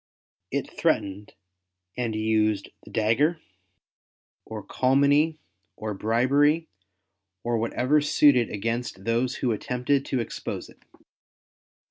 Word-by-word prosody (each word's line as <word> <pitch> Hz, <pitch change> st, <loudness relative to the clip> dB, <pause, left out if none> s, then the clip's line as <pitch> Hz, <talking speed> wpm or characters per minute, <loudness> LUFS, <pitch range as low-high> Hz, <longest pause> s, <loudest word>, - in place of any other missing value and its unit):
It -, -, -2 dB
threatened 100 Hz, +1 st, -1 dB, 0.6 s
and 120 Hz, -3 st, -2 dB
used 110 Hz, -2 st, +1 dB
the -, -, -13 dB
dagger, 135 Hz, +10 st, +2 dB, 1.1 s
or 110 Hz, -2 st, -7 dB
calumny, 140 Hz, +4 st, +3 dB, 0.4 s
or 110 Hz, -1 st, -4 dB
bribery, 140 Hz, +10 st, +2 dB, 0.8 s
or 120 Hz, -1 st, 0 dB
whatever 125 Hz, +6 st, +2 dB
suited 145 Hz, -5 st, +4 dB
against 115 Hz, -1 st, -3 dB
those 120 Hz, +3 st, 0 dB
who 125 Hz, -, 0 dB
attempted 125 Hz, +5 st, 0 dB
to 130 Hz, -, 0 dB
expose 115 Hz, -, -5 dB
it. -, -, -19 dB
120 Hz, 100 wpm, -26 LUFS, 110-140 Hz, 1.1 s, suited